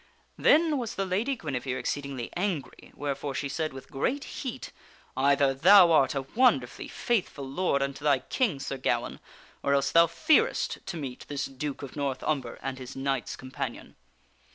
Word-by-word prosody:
Then 310 -1 +4
was 235 -3 -4
the 195 - -1
Lady 210 +9 0
Guinevere 135 - -3
exceedingly 135 -1 -4
angry, 175 -7 -3
wherefore 140 -1 -3
she 140 - -2
said 155 +3 -2
with 135 -1 -11
great 265 - -1
heat: 260 -6 -6 0.2
" - - -30
Either 140 +1 +3
thou 180 +5 +7
art 145 -3 +4
a 135 - -1
wonderfully 175 - +1
faithful 185 - -2
lord 140 -1 0
unto 140 +1 -5
thy 145 -2 +4
King, 175 - -1
Sir 135 0 -4
Gawaine, 130 - -1 0.4
or 140 - +2
else 140 0 +1
thou 170 0 +6
fearest 455 - +2
to 185 -3 -4
meet 135 -5 -6
this 140 -1 -2
Duke 140 +1 -5
of 135 - -8
North 140 -3 -2
Umber 135 -6 -2
and 135 -1 -4
his 130 0 -8
knights 135 0 -2
companion." 130 -1 -6
140 Hz, 170 wpm, -28 LUFS, 135-185 Hz, 0.4 s, thou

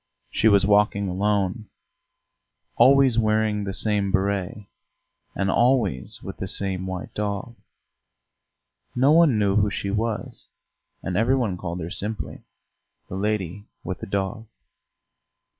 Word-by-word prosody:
She - - +2
was 100 -2 +5
walking 100 -1 +3
alone, 100 +2 -1 1.1
always 135 -3 +5
wearing 110 -2 +1
the 95 - -3
same 105 -2 0
béret, 100 +2 -1 0.7
and 95 -1 0
always 115 - +1
with - - -7
the - - -4
same 95 -1 -2
white 95 -1 -6
dog; 105 +3 -3 1.4
no 130 +4 +4
one 160 -7 +5
knew 100 -1 +2
who 105 0 +3
she 100 0 -3
was, 110 +1 -3 0.6
and 90 - -3
every 115 +7 +3
one 115 -8 0
called 90 -1 -5
her 80 +2 -6
simply 105 -5 -4 0.7
"the - - -5
lady 100 -1 -2 0.2
with 95 - -5
the 115 - -7
dog." 100 +3 -3
105 Hz, 125 wpm, -24 LUFS, 95-110 Hz, 1.4 s, was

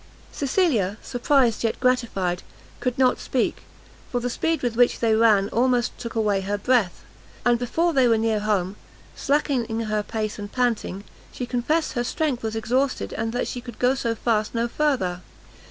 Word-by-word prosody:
Cecilia, 260 - +1
surprised, 245 -2 +2
yet 225 - 0
gratified, 225 -9 0 0.4
could 250 -1 -2
not 255 -1 +3
speak, 255 - -1 0.5
for 245 - 0
the 245 0 -2
speed 325 +4 -1
with 240 -2 -1
which 245 +1 +3
they 225 -2 +2
ran 220 -3 +4
almost 245 0 +1
took 235 -1 -6
away 210 -3 +1
her 200 +2 -2
breath; 215 -4 +1 0.4
and 240 -1 +4
before 330 +8 0
they 265 -3 +4
were 230 -1 +4
near 220 -1 +1
home, 205 -2 -1 0.4
slackening 255 -6 0
her 215 -1 -1
pace, 215 0 -4
and 205 0 -6
panting, 235 -6 -1 0.3
she 250 - -4
confessed 265 +7 0
her 240 -3 0
strength 280 -1 -1
was 220 0 -3
exhausted, 250 +5 0
and 225 0 -2
that 245 - -1
she 245 - -5
could 240 -2 -10
go 250 +1 +3
so 235 -3 -1
fast 220 -1 0
no 230 +1 +1
further. 235 -11 0
235 Hz, 170 wpm, -24 LUFS, 215-255 Hz, 0.5 s, ran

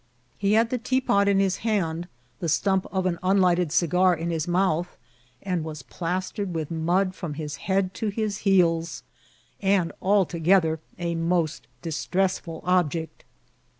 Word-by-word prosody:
He 200 +1 +2
had 225 +1 +3
the 250 - 0
tec^ot 230 -5 +2
in 200 -1 +4
his 190 -1 +1
hand, 175 -6 -1 0.3
the 170 - -2
stomp 190 +4 +1
of 190 -1 -1
an 175 -2 0
nnlighted 180 -3 +3
cigar 180 +2 +3
in 170 +1 -3
his 165 0 -2
mouth, 175 -1 0 0.5
was 160 -6 -3
plastered 185 +2 -3
with 160 -1 -3
mud 175 +4 +1
frcnn 170 -6 -6
his 150 -1 -5
head 190 -1 0
to 220 - -3
his 210 0 -2
heels, 170 -4 +2 0.6
and 190 -4 +2
altogether 180 -4 +3 0.2
a 170 -1 -2
most 165 -1 -1 0.2
distressfnl 170 +1 -1
object. 170 -3 0
180 Hz, 140 wpm, -25 LUFS, 165-195 Hz, 0.6 s, in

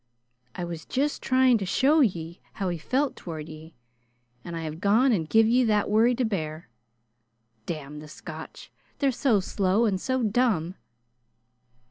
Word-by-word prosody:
I 180 - -4
was 170 -2 -6
just 285 +3 -1
tryin' 255 -2 +3
to 195 - -3
show 280 - +3
ye 170 - -1
how 195 -2 -2
he 175 -2 -3
felt 265 - 0
toward 160 -3 -7
ye, 160 +1 -12 0.7
and 170 - -6
I've 160 0 -5
gone 225 +7 +4
an' 180 -8 +1
give 225 +7 +4
ye 245 +3 +3
that 210 -2 +1
worry 230 +3 +4
to 250 0 0
bear. 160 -6 -4 1.0
Damn 150 -2 -6
the 150 - -10
Scotch! 155 +1 -10 0.3
They're 275 -2 +2
so 245 -4 +2
slow 195 +3 +1
an' 195 -4 0
so 260 +3 -1
dumb!" 210 -6 +1
200 Hz, 155 wpm, -26 LUFS, 165-245 Hz, 1.0 s, gone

